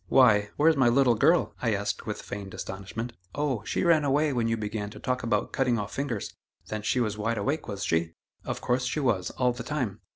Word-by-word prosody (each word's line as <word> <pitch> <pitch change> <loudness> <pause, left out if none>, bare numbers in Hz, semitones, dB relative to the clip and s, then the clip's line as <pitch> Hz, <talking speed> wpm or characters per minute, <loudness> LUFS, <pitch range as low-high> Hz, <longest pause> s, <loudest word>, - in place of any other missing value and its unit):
"Why! 105 -6 +5
where's 160 +2 +5
my 130 -4 +4
little 125 0 +4
girl?" 160 +10 +3
I 115 -4 +2
asked 100 0 -3
with - - -4
feigned 100 -1 -7
astonishment. 100 +5 -5 0.2
"Oh! 140 -7 -1
she - - -1
ran 165 -3 +4
away 145 +1 +2
when 120 -2 +1
you 115 0 0
began 105 -1 -3
to - - -11
talk 125 0 -1
about 110 -3 0
cutting 125 -3 +2
off 105 -2 -4
fingers." 130 -7 -3 0.4
"Then 110 0 -3
she 105 +4 +1
was 110 -3 -1
wide 115 +2 0
awake, 140 +10 -1
was 100 -1 -4
she?" 80 0 0 0.3
"Of - - -4
course 125 +1 0
she 140 - -1
was, 110 -10 +1
all 125 -1 +3
the 120 - -7
time." 125 -6 -3
115 Hz, 220 wpm, -27 LUFS, 105-135 Hz, 0.4 s, Why